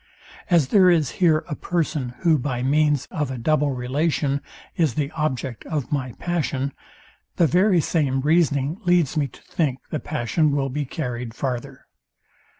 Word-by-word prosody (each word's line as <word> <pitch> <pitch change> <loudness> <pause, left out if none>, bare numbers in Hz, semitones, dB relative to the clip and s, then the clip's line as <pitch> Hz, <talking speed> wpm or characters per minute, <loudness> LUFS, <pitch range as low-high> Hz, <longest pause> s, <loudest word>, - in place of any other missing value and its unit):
As 165 -7 +3
there 190 -3 +6
is 160 -6 +3
here 160 -3 +4
a - - -4
person, 150 -8 -2
who 160 -3 +4
by 125 -2 -2
means 145 0 +2
of 150 -4 -2
a 130 - -4
double 150 +4 +1
relation 140 +2 0 0.3
is 155 -9 +1
the 145 -1 -1
object 135 -6 -3
of 150 -5 -3
my 130 -4 -2
passion, 140 -6 -2 0.6
the 170 - +4
very 180 +4 +4
same 140 -5 0
reasoning 150 +1 +2
leads 175 -5 +2
me 145 -2 +1
to 125 - -17
think 145 -6 -1
the 155 - -1
passion 150 +2 0
will 135 -1 0
be 145 +2 -2
carryed 125 -5 -5
farther. 125 -3 -4
145 Hz, 155 wpm, -23 LUFS, 130-160 Hz, 0.6 s, there